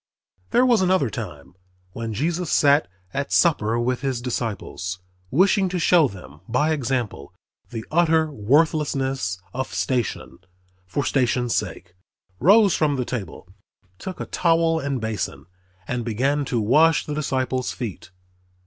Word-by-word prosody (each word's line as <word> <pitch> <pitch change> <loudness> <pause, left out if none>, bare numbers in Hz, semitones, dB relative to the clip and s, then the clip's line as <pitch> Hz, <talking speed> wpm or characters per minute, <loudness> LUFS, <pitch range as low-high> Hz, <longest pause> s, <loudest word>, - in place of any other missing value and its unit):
There 245 +2 +4
was 240 -5 +4
another 185 - +2
time, - - -7 0.4
when 115 +3 -5
Jesus 165 - -1
sat 145 +1 +4 0.3
at 140 0 -3
supper 120 -9 +3
with 125 +1 -1
his 135 -3 -1
disciples, 115 -6 -4 0.3
wishing 190 - +3
to 180 - -2
show 170 -3 +4
them, 80 - -12
by 150 +7 +2
example, 125 - -2 0.3
the 115 -2 -6
utter 160 -1 +3
worthlessness 135 - +1 0.2
of 130 +1 -3
station, 125 -6 -2 0.5
for 130 +10 -2
station's 125 -3 +1
sake, 85 - -4 0.5
rose 200 - +6
from 150 -2 +1
the 125 -2 -2
table, 95 -6 -6 0.5
took 185 - -7
a - - -3
towel 165 -1 +2
and 140 -3 -2
basin, 110 -2 -4 0.4
and 125 -1 -2
began 135 +6 0
to 120 -3 -1
wash 150 +9 +4
the 150 - -4
disciples' 130 -3 -1
feet. 100 -7 -6
135 Hz, 135 wpm, -23 LUFS, 115-160 Hz, 0.5 s, rose